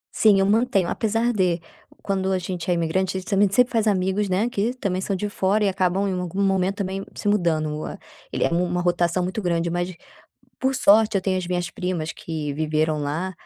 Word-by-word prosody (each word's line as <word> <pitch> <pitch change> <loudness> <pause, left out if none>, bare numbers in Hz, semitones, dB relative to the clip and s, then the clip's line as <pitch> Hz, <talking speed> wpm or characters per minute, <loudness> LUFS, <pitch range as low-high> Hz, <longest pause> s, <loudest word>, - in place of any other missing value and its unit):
Sim, 210 -3 +5
eu 195 - +3
mantenho. 210 -3 +2
Apesar 225 +2 0
de, 180 -5 +1 0.4
quando 190 -1 -1
a 190 - +2
gente 180 -1 -4
é 180 - +4
imigrante, 180 +3 0
a - - -1
gente 185 - -12
também 200 -1 +3
sempre 250 +5 +3
faz 225 -1 +2
amigos, 190 +1 +1
né, 195 +5 +1
que 225 0 -1
também 190 -7 -2
são 195 +1 -1
de 205 +3 -2
fora 205 +1 +1
e - - +3
acabam 190 +1 0
em 195 - -1
algum 180 +1 -4
momento 190 0 +1
também 195 -1 -3
se - - -5
mudando 165 -7 +1
o - - -5
a - - -7 0.3
ele - - -1
é - - +2
u 175 +1 +2
uma 180 0 -1
rotação 175 0 +1
muito 185 +4 -3
grande. 170 -2 0
Mas, 175 +1 -1 0.7
por 265 +1 0
sorte 215 -1 +4
eu - - +2
tenho 185 -1 0
as 180 - -4
minhas 175 -1 -2
primas 175 -4 -3
que 155 -3 -5
viveram 155 +1 0
lá, 155 +6 -2
185 Hz, 225 wpm, -23 LUFS, 175-200 Hz, 0.7 s, Sim